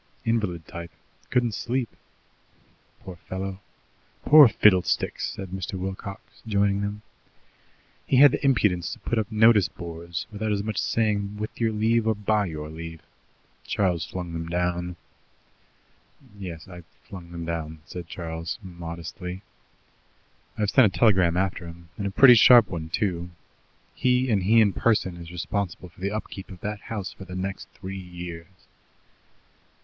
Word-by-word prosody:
"Invalid 105 -8 -1
type; 85 0 -7 0.4
couldn't 120 -3 +1
sleep." 125 +3 -1 1.1
"Poor 95 -2 -9
fellow!" 95 +3 -5 0.7
"Poor 150 -2 +9
fiddlesticks!" 95 -5 +2
said 95 -1 -7
Mr. 95 +1 -5
Wilcox, 95 +1 -7
joining 100 -1 +2
them. 105 +1 -4 1.0
"He 130 - +3
had 140 0 +9
the 145 - -3
impudence 105 -10 +2
to - - -10
put 120 - -1
up 110 +1 -3
notice 110 -4 +5
boards 85 +2 -6
without 110 +1 -2
as 100 -1 0
much 110 0 -4
as - - +2
saying 105 -2 0
with 110 +2 -6
your 115 -1 +2
leave 110 +1 +1
or 110 - +2
by 105 0 +1
your 75 -2 -6
leave. 80 0 -8 0.6
Charles 90 -5 0
flung 90 -2 -6
them 80 0 -4
down." 90 0 -1 1.4
"Yes, 85 -5 -8
I 90 -1 -10 0.2
flung 90 -3 -11
them 85 -1 -6
down," 80 -2 -5
said 85 +2 -8
Charles 80 -1 -5
modestly. 85 +1 -7 1.1
"I've 105 -2 0
sent 130 -4 +6
a 95 - -5
telegram 95 -7 +4
after 90 -2 -1
him, 85 0 -12
and 100 - -3
a - - -1
pretty 125 +6 +8
sharp 120 0 +8
one, 80 -3 -5
too. 90 -1 -1 0.6
He, 125 0 +2
and 100 -3 +2
he 110 +5 +5
in 100 -3 +3
person 105 -6 +1
is 85 -1 -9
responsible 90 +1 -4
for 85 - -20
the 100 - 0
upkeep 100 -2 -6
of 90 -3 -11
that 105 0 -4
house 100 -5 -5
for - - -11
the 90 0 -8
next 95 +1 -4
three 95 0 -8
years." 90 -2 -8
95 Hz, 155 wpm, -25 LUFS, 85-105 Hz, 1.4 s, Poor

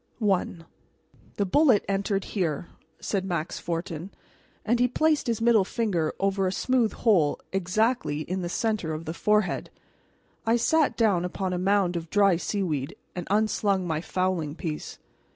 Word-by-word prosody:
R.W.C. 190 -5 0
I - - -34 0.2
"The 200 - 0
bullet 255 +1 +4
entered 195 0 0
here," 170 -5 -2 0.3
said 195 -3 -2
Max 175 -3 -3
Fortin, 170 +1 -4 0.6
and 235 +2 +2
he 250 - +4
placed 305 +3 +1
his 230 -2 -1
middle 230 -3 +5
finger 185 -7 -1
over 195 -1 +1
a - - 0
smooth 245 +2 +1
hole 175 -11 +2
exactly 195 -3 0
in 185 +4 -3
the 175 - -3
center 215 -6 -1
of 160 +2 -7
the 160 - -4
forehead. 210 +3 +1 0.7
I 225 +1 +3
sat 310 +5 +2
down 205 -7 +3
upon 185 +1 -2
a 180 - -1
mound 190 -1 +2
of 165 -1 -4
dry 200 -3 +4
seaweed 165 -8 -2 0.2
and 180 -2 -5
unslung 205 -2 +1
my 160 -2 -1
fowling 180 -5 -1
piece. 160 -3 -5
190 Hz, 155 wpm, -26 LUFS, 170-215 Hz, 0.7 s, middle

